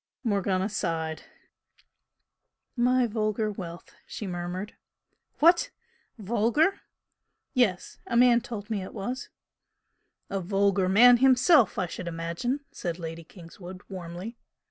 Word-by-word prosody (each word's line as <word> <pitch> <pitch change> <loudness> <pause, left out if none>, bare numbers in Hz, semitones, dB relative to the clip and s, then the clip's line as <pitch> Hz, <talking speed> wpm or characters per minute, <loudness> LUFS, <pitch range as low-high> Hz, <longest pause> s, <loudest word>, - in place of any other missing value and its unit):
Morgana 195 -4 0
sighed. 165 -6 -3 1.5
"My 250 0 +3
vulgar 215 -1 -1
wealth!" 175 -4 -9
she 215 - -6
murmured. 180 +2 -5 0.6
"What? 345 +10 +4 0.5
Vulgar?" 235 - +1 0.7
"Yes. 225 - 0
A 235 - 0
man 240 -1 +6
told 220 -1 -7
me 205 -3 -1
it 185 - -9
was." 245 +6 -5 1.0
"A 195 - -2
vulgar 195 0 +1
man 240 +5 +7
himself, 260 - +5
I 185 - +1
should 175 +1 -7
imagine!" 170 - -3
said 170 -2 -4
Lady 165 -1 -7
Kingswood, 180 +2 -12
warmly. 185 +5 -7
200 Hz, 110 wpm, -27 LUFS, 180-240 Hz, 1.5 s, man